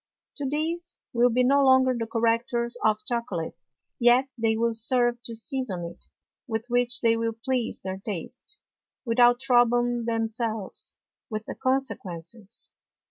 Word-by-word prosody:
Tho 280 - -1
these 335 +4 -3 0.2
will 240 +1 +4
be 250 +2 +2
no 280 +2 +4
longer 260 -1 +5
the 230 -1 -3
Correctors 235 +1 0
of 215 0 +2
Chocolate, 235 -9 -2 0.4
yet 245 +3 +5
they 225 -2 +1
will 230 0 +1
serve 240 +1 +2
to 230 - -4
season 225 -6 -3
it, 170 - -10 0.4
with 225 -1 -2
which 245 0 +1
they 230 -1 +4
will 230 0 -1
please 255 -3 -1
their 190 0 -4
Taste, 220 - -6 0.5
without 240 +1 +5
troubling 240 -1 +3
themselves 225 -2 -2 0.3
with 215 -1 -4
the - - -5
Consequences. 215 -7 -3
235 Hz, 135 wpm, -26 LUFS, 225-250 Hz, 0.5 s, longer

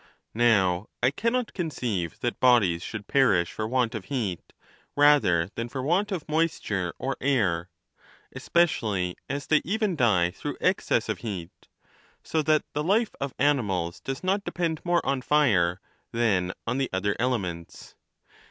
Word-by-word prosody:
Now, 105 -5 +2 0.2
I 125 - +4
cannot 230 - -1
conceive 120 - -3
that 120 - -2
bodies 105 -10 +4
should 105 +1 -6
perish 100 -12 +3
for 110 - -3
want 125 -1 0
of 110 -5 -5
heat, 110 -11 -3 0.4
rather 135 - +4
than 115 +1 -4
for 130 +1 -4
want 185 +9 +1
of 180 -6 -4
moisture 150 - -1
or 135 +1 -3
air, 95 -11 +1 0.7
especially 110 - +1
as 140 +1 -3
they 155 - +3
even 210 0 0
die 95 - +3
through - - -6
excess - - +1
of - - -2
heat; 95 -7 -5 0.7
so 160 - 0
that 155 0 +2
the 150 - -1
life 210 +7 +2
of 140 -2 -3
animals 105 -12 0
does 135 +4 -5
not 195 +2 +1
depend 165 -5 -2
moi'e 175 -1 +2
on 135 -1 -1
fire 105 -13 +2 0.3
than 100 -6 +1
on 125 +3 -1
the 135 - 0
other 100 +2 0
elements. 95 -9 -3
120 Hz, 150 wpm, -26 LUFS, 95-150 Hz, 0.7 s, I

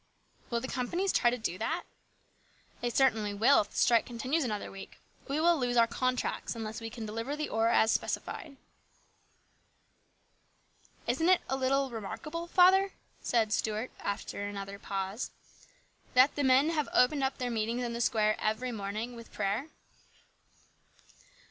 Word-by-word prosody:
" - - -33
Will 235 - 0
the 260 - -5
companies 345 +11 -1
try 240 - +4
to 245 - -1
do 185 -6 -3
that? 325 +10 -1 0.5
" - - -33
"They 240 - 0
certainly 225 -5 +2
will 235 +7 +5
if 205 - -7
the - - -17
strike 235 -1 +4
continues 255 +7 -1
another 215 -5 -3
week. 195 0 -10 0.3
We 285 +2 -1
lose 295 -8 +2
our 230 - +7
contracts 255 +1 -2
unless 220 0 -5
we 225 - -5
can 225 -1 -7
deliver 230 +6 -3
the 300 0 -3
ore 225 +1 +1
as 225 -1 +4
specified." 290 -5 -3 2.5
"Isn't 275 +9 +1
it 370 - +5
a 265 - 0
little 270 0 +1
remarkable, 305 - -5
father," 380 +2 +5 0.3
said 225 -3 +1
Stuart 220 +3 -1
after 200 0 -4
another 200 0 -6
pause, 195 +3 -3 0.4
" - - -34
that 255 +3 +6
the 290 - -1
men 265 +3 +5
have 305 -3 -1
opened 275 +3 +4 0.2
their 250 -1 -2
meetings 230 +2 -1
in 235 -1 -3
the 235 - -3
square 215 -2 +2
every 220 +4 -1
morning 215 +3 -4
with 230 0 -11
prayer?" 210 +7 -1
240 Hz, 155 wpm, -30 LUFS, 220-275 Hz, 2.5 s, our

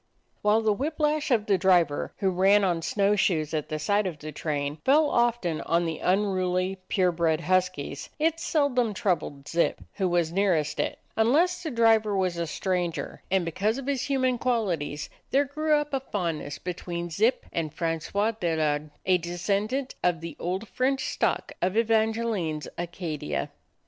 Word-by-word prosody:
While 210 +2 +3
the 220 -1 +2
whip 295 +9 -3
lash 300 0 +1
of 225 -5 +2
the 195 -3 +2
driver, 175 -5 +3
who 190 -1 +1
ran 195 +3 +4
on 175 -3 +1
snow 200 +4 +2
shoes 160 -6 +1
at 155 -2 -2
the 155 - -2
side 205 +6 +1
of 170 -5 -5
the 155 +1 -7
train, 145 -1 -3
fell 295 +2 +4
often 235 -9 +1
on 170 +1 +1
the 165 -2 -3
unruly, 185 -1 +1
pure 185 -2 +2
bred 165 -1 +1
huskies, 185 -6 -1
it 325 +1 +1
sel 300 -4 +1
dom 240 -4 +1
troubled 155 -8 -1
Zip, 170 0 +1
who 190 -3 0
was 170 -2 +1
nearest 175 -5 +1
it, - - -1 0.2
unless 325 +11 +3
the 330 - -3
driver 225 -4 +3
was 185 -2 0
a 170 -1 -2
stranger; 175 0 -2
and 190 -2 +2
because 200 +8 0
of 275 - -6
his 275 -2 0
human 260 -3 +1
qualities, 180 - -1 0.2
there 280 +2 +3
grew 305 +2 +1
up 295 -1 -1
a 270 - +2
fondness 170 - -3
between 175 -1 -5
Zip 225 +9 +1
and 160 -3 -2
Francois 170 +7 -1
Delard, 155 -7 -1 0.2
a 185 -1 +4
de 170 +1 -5
scendant 215 +9 -1
of 175 -2 +2
the 165 0 -6
old 190 +5 -3
French 265 +4 0
stock - - 0
of 185 +4 0
Evangel 225 0 +2
ine's 160 -6 -3
Acadia. 170 - -4
190 Hz, 175 wpm, -27 LUFS, 170-230 Hz, 0.2 s, ran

